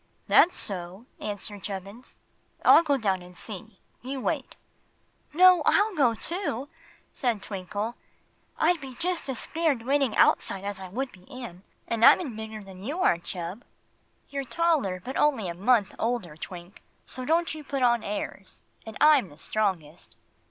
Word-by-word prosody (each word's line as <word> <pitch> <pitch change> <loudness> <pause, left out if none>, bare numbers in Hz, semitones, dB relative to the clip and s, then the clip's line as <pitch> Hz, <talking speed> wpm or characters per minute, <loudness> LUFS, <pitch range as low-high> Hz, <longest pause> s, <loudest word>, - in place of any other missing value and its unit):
"That's 355 - +5
so," 185 +2 -4
answered 205 -1 -5
Chubbins. 200 +5 -7 0.5
"I'll - - +9
go 290 -4 +1
down 195 -6 0
and 180 0 -13
see. 215 -1 -9 0.2
You 265 +2 -5
wait." 280 0 -2 0.8
"No; 360 +2 +7
I'll 415 +6 +3
go 255 -9 +3
too," 290 - -3 0.4
said 230 -6 -1
Twinkle. 205 +3 -4 0.6
"I'd 350 -3 +2
be 265 -2 -8
just 350 0 -1
as 260 - -2
scared 310 -6 0
waiting 275 -2 +1
outside 195 - +3
as 200 -1 -4
I 190 - -7
would 250 +8 -3
be 180 -1 -18
in. 240 -9 -9 0.3
And 230 -1 -1
I - - +10
'in 285 -11 -5
bigger 220 -1 -7
than 190 -1 -12
you 295 - -3
are, 175 - +3
Chub." 175 +5 -6 0.7
"You're 280 -1 -3
taller, 295 - +1
but 260 - -4
you're - - +2
only 270 -10 +2
a 170 - -3
month 205 +3 +2
older, 225 -9 -2
Twink; 175 +3 -10 0.2
so 255 - -6
don't 330 +3 +1
you 310 -1 -8
put 275 -2 -2
on 240 -2 +3
airs. 200 -2 -6 0.2
And 220 - -7
I'm 295 - +5
the 145 - -16
strongest." 175 -5 -3
230 Hz, 165 wpm, -27 LUFS, 195-280 Hz, 0.8 s, I